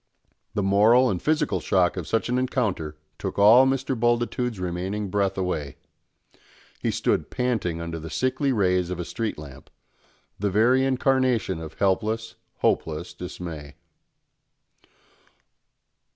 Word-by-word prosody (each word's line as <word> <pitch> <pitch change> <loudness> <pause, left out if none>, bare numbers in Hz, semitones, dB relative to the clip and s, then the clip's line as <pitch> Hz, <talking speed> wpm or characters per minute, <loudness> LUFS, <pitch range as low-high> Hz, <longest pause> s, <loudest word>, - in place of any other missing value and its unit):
The 100 - 0
moral 110 +6 +5
and 90 - -3
physical 150 - +1
shock 90 -1 +2
of 90 -5 -5
such 115 +4 0
an 125 +1 +1
encounter 100 - -2 0.2
took - - -4
all 115 +6 +7
Mr. 135 0 0
Bultitude's 120 -1 0
remaining 95 +3 -3
breath 100 -1 0
away. 80 -7 -2 1.0
He - - -1
stood - - 0
panting 115 -10 -1
under 85 0 -5
the 80 +1 -8
sickly 130 - 0
rays 90 -6 +1
of 90 -1 -4
a 90 - -3
street 115 +2 -3
lamp, 70 -2 -11 0.7
the 100 +1 0
very 120 +7 +3
incarnation 130 -7 +1
of 80 -1 -8
helpless, 110 +3 0 0.3
hopeless 80 +2 0
dismay. 85 -5 -8
100 Hz, 125 wpm, -25 LUFS, 90-125 Hz, 1.0 s, all